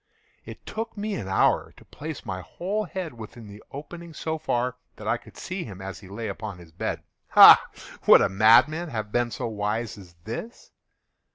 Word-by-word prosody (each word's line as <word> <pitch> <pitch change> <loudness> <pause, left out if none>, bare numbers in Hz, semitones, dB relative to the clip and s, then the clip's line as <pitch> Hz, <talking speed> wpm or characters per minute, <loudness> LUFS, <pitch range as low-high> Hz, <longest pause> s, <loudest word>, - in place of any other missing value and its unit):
It - - -11
took 225 0 -5
me 210 +1 -3
an 100 - -4
hour 95 - +2
to - - -17
place 155 -1 -8
my 95 0 -4
whole 200 - -3
head 180 -4 -5
within 115 0 -10
the 105 +1 -12
opening 165 +3 -9
so 160 0 -3
far 125 -4 -1 0.2
that 105 - -9
I 115 +2 +2
could - - -17
see 185 0 -5
him 95 -4 -9
as 95 -3 -7
he 95 - -14
lay 110 +3 -5
upon 100 -1 -6
his 85 -2 -15
bed. 80 - -4 0.3
Ha!—would - - +7
a - - +4
madman 115 - +4
have 110 -5 -4
been 120 +1 +1
so 115 - -4
wise 105 0 -3
as 90 -3 -15
this? 120 - -7
115 Hz, 185 wpm, -25 LUFS, 100-160 Hz, 0.3 s, Ha!—would